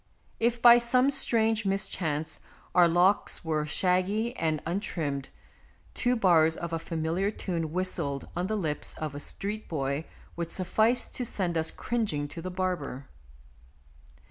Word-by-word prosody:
If, 235 +1 +1
by 240 0 +9
some 250 +3 +3
strange 225 -4 +2
mis 195 0 +1
chance, 160 -4 -3 0.3
our 175 -1 +6
locks 175 +2 +2
were 155 -1 -1
shaggy 190 +8 0
and 155 -2 0
un 175 +4 -1
trimmed, 145 -9 -3 0.6
two 250 0 +1
bars 165 -7 +4
of 170 -1 -5
a 165 - 0
familiar 165 +4 -1
tune 170 -6 -3
whistled 165 -6 -2
on 175 +2 -1
the 215 - -1
lips 155 -6 -2
of 155 -2 -5
a 145 - -6
street 210 +8 -4
boy 140 0 -2 0.3
would 170 -1 -3
suffice 220 +7 +1
to 250 - -4
send 185 -7 -2
us 160 0 +1
cringing 210 -12 -2
to 165 - -8
the 185 - -4
barber. 180 -8 -3
180 Hz, 150 wpm, -28 LUFS, 160-210 Hz, 0.6 s, by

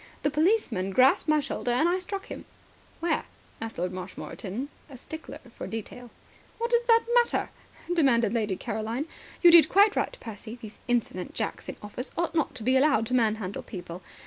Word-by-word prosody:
The 290 - +2
policeman 305 - +1
grasped 260 +7 +4
my 305 0 +5
shoulder, 275 -3 -3
and 250 +7 +3
I 360 +2 +1
struck 390 +2 -5
him." - - -8 0.6
"Where?" 335 -1 +1 0.4
asked 225 0 -5
Lord 180 +1 -2
Marshmoreton, 190 +6 -6 0.2
a 265 - -10
stickler 315 +5 -8 0.2
for - - -6
detail. 230 +2 -7 0.5
"What 470 +1 -2
does 475 0 +4
that 460 -1 +5
matter?" 480 -1 +2 0.4
demanded 240 - +3
Lady 215 -5 0
Caroline. 225 +6 -3 0.4
"You 345 - +10
did 335 -1 +8
quite 405 +2 +5
right, - - -1
Percy. 220 +1 -8
These 215 -2 -11
insolent 235 -7 -1
jacks - - -3
in - - -5
office 210 +5 -5
ought 340 0 0
not 315 -5 0
to 240 - -8
be 255 +3 +3
allowed 265 -5 +4
to 255 - -3
manhandle 220 -5 +1
people. 175 0 -8
250 Hz, 175 wpm, -27 LUFS, 215-320 Hz, 0.6 s, You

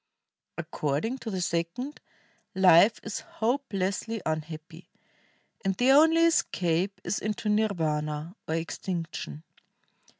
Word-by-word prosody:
According 155 - -2
to 230 - -6
the 190 -3 -2
second, 175 - -2 0.6
life 190 +3 +6
is 215 - -4
hopelessly 225 -3 -2
unhappy, 160 +2 -5 0.7
and 195 -1 0
the 250 +2 +4
only 320 +4 +6
escape 185 - +1
is - - -1
into 215 0 -2
nirvana, 160 -6 0
or 160 - 0
extinction. 165 - -4
185 Hz, 100 wpm, -28 LUFS, 160-220 Hz, 0.7 s, life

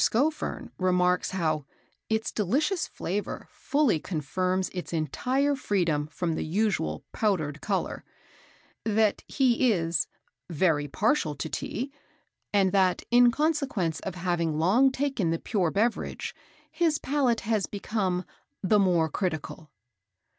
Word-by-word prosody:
Scoffern 295 +7 0
remarks 180 -1 +2
how 155 -5 0 0.5
"Its 220 0 0
delicious 290 - 0
flavour 200 +4 -4
fully 280 - +1
confirms 185 +4 -1
its 180 -2 -5
entire 255 - +1
freedom 170 - 0
from 165 +1 -2
the - - -2
usual 165 - -1
powdered 155 -9 0
colour;" 200 -3 -2 0.8
that 215 -1 +2
he 255 -2 +3
is 165 -4 0 0.4
"very 155 -3 +2
partial 155 - +1
to 140 - -4
Tea;" 255 - -4 0.6
and 195 -2 +3
that, 185 -2 +2
in 245 0 +7
consequence 270 - 0
of 190 - -5
having 170 -3 0
long 220 +12 +4
taken 265 - 0
the 165 - +1
pure 185 -2 0
beverage, 225 +7 -1 0.4
his 330 -3 +2
palate 270 -5 +1
had 215 -3 0
become 195 -3 -1 0.4
"the 210 +2 +4
more 175 -4 +3
critical." 160 -1 -4
190 Hz, 120 wpm, -27 LUFS, 165-240 Hz, 0.8 s, in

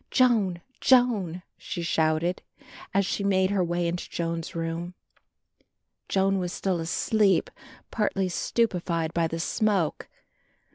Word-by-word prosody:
"Joan, 215 -9 +3 0.2
Joan," 215 -10 +3 0.2
she 175 - -5
shouted, 160 +2 +1 0.5
as 200 0 +2
she 200 - -2
made 190 -1 +2
her 195 -2 +2
way 175 0 0
into 175 +1 -3
Joan's 165 -1 -3
room. 165 +2 -4 1.1
Joan 195 0 +2
was 180 -1 -2
still 185 -2 -1
asleep, 195 +3 +1 0.4
partly 195 -3 0
stupified 175 -5 -1
by 170 -1 +1
the 165 +1 -4
smoke. 195 -3 0
180 Hz, 115 wpm, -26 LUFS, 170-200 Hz, 1.1 s, Joan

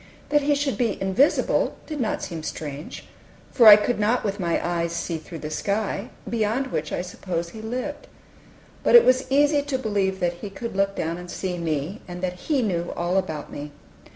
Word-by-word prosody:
That 295 0 +4
He 290 +1 +2
should 280 -1 -1
be 230 -4 0
invisible 190 +10 +2
did 305 -3 -4
not 220 - -1
seem 165 -3 -5
strange, 150 -1 -6 0.5
for 235 -4 +6
I 210 - +13
could 210 +2 0
not 220 +4 +2
with 200 0 -2
my 170 -3 +1
eyes 170 -1 -1
see 170 -1 -3
through 165 +2 -9
the 155 - -4
sky, 200 +3 -2 0.2
beyond 235 +4 0
which 155 0 -2
I - - -2
supposed 175 -2 -4
he 220 - -9
lived. 255 +6 -4 0.7
But - - +4
it 475 - +10
was 255 +1 +3
easy 290 +1 +4
to 285 -2 -2
believe 200 -5 -1
that 175 -1 +1
He 205 - -5
could 230 +2 -6
look 195 0 +1
down 165 +2 -2
and 180 0 -9
see 180 -1 -3
me, 165 +4 -2
and 180 0 -7
that 180 -1 -4
He 280 -5 +3
knew 175 -5 -1
all 175 +2 0
about 160 -6 -2
me. 145 0 -7
195 Hz, 200 wpm, -24 LUFS, 170-245 Hz, 0.7 s, I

